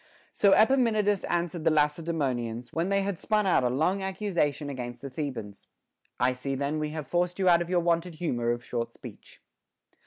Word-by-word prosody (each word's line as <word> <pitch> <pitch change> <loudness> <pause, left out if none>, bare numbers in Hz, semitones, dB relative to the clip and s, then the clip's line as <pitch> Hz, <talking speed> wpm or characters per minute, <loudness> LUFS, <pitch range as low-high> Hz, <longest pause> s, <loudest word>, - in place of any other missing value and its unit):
So 200 -2 +4
Epaminondas 215 -4 +3
answered 170 -1 -2
the - - +4
Lacedaemonians, 145 -7 -1
when 170 +3 -1
they 195 0 +2
had 195 -3 -3
spun 215 -1 +1
out 180 -8 +3
a 125 - +2
long 160 +10 +1
accusation 185 -7 -1
against 125 -3 -6
the 140 - -6
Thebans: 130 -8 -6 0.5
I 125 +1 +3
see 135 +2 -4
then 140 +3 -1
we 150 0 -2
have 155 -1 -5
forced 175 0 0
you 190 -1 +1
out 170 -1 +6
of 175 - -4
your 180 -1 +2
wonted 170 0 0
humor 120 -8 -1
of 120 +1 -2
short 115 -1 -3
speech. - - -13
160 Hz, 185 wpm, -28 LUFS, 130-185 Hz, 0.5 s, out